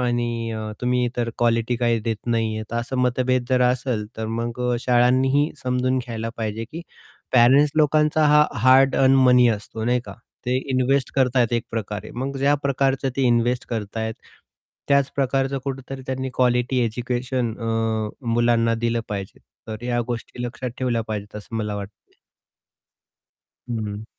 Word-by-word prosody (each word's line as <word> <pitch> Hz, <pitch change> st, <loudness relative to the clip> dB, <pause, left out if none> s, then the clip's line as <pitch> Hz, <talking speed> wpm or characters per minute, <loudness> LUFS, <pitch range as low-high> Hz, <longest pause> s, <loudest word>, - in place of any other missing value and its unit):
आणि 120 Hz, -2 st, -1 dB
अ, 110 Hz, -1 st, -4 dB
तुम्ही 125 Hz, 0 st, +1 dB
तर 120 Hz, -1 st, -1 dB
क्वालिटी 115 Hz, 0 st, +1 dB
काही 120 Hz, -1 st, +1 dB
देत 110 Hz, 0 st, -2 dB
नाही 115 Hz, -2 st, 0 dB
आहेत 110 Hz, 0 st, -7 dB
,असं 120 Hz, +3 st, -2 dB
मतभेद 125 Hz, 0 st, +1 dB
जर 130 Hz, -1 st, +3 dB
असेल, 125 Hz, -4 st, -2 dB
तर 110 Hz, 0 st, -3 dB
मग 115 Hz, +2 st, -3 dB
अ, -, -, +1 dB
शाळांनीही 130 Hz, +4 st, +3 dB
समजून 130 Hz, +1 st, 0 dB
घ्यायला 115 Hz, -3 st, -4 dB
पाहिजे 110 Hz, 0 st, -3 dB
की 165 Hz, +2 st, -6 dB, 0.5 s
पॅरेंट्स 130 Hz, +4 st, +6 dB
लोकांचा 155 Hz, 0 st, +3 dB
हा 150 Hz, 0 st, +6 dB, 0.2 s
हार्ड 130 Hz, +2 st, +5 dB
अर्न 135 Hz, 0 st, +5 dB
मनी 125 Hz, -1 st, +6 dB
असतो 110 Hz, 0 st, -3 dB
नाही 125 Hz, +1 st, +2 dB
का, -, -, -8 dB, 0.3 s
ते 125 Hz, +1 st, +1 dB
इन्व्हेस्ट 130 Hz, +1 st, +1 dB
करताय 125 Hz, -2 st, +3 dB
एक 115 Hz, -, -1 dB
प्रकारे, 105 Hz, -2 st, -4 dB
मग 135 Hz, +3 st, -3 dB
ज्या 140 Hz, +2 st, +3 dB
प्रकारचं 135 Hz, -1 st, +1 dB
ते 135 Hz, -, +1 dB
इन्व्हेस्ट 120 Hz, +2 st, +1 dB
करत 110 Hz, -3 st, -4 dB
आहेत, 110 Hz, 0 st, -2 dB, 0.7 s
त्याच 140 Hz, -1 st, +3 dB
प्रकारचं 135 Hz, 0 st, 0 dB
कुठेतरी 135 Hz, -1 st, -5 dB
त्यांनी 130 Hz, 0 st, -3 dB
क्वालिटी 125 Hz, 0 st, +2 dB
एज्युकेशन 120 Hz, +1 st, -2 dB
अ, 115 Hz, -1 st, -1 dB, 0.2 s
मुलांना 115 Hz, -1 st, +3 dB
दिलं 115 Hz, 0 st, -1 dB
पाहिजे. 100 Hz, -2 st, -5 dB, 0.3 s
तर 110 Hz, +1 st, -6 dB
या 120 Hz, -1 st, 0 dB
गोष्टी 120 Hz, 0 st, -5 dB
लक्षात 125 Hz, +1 st, -4 dB
ठेवल्या 120 Hz, -3 st, 0 dB
पाहिजेत 105 Hz, -1 st, -5 dB
असं 105 Hz, +2 st, -7 dB
मला 105 Hz, -2 st, -2 dB
वाटतं. 100 Hz, 0 st, -10 dB, 1.6 s
हं. 110 Hz, -3 st, -4 dB
120 Hz, 155 wpm, -23 LUFS, 115-130 Hz, 1.6 s, पॅरेंट्स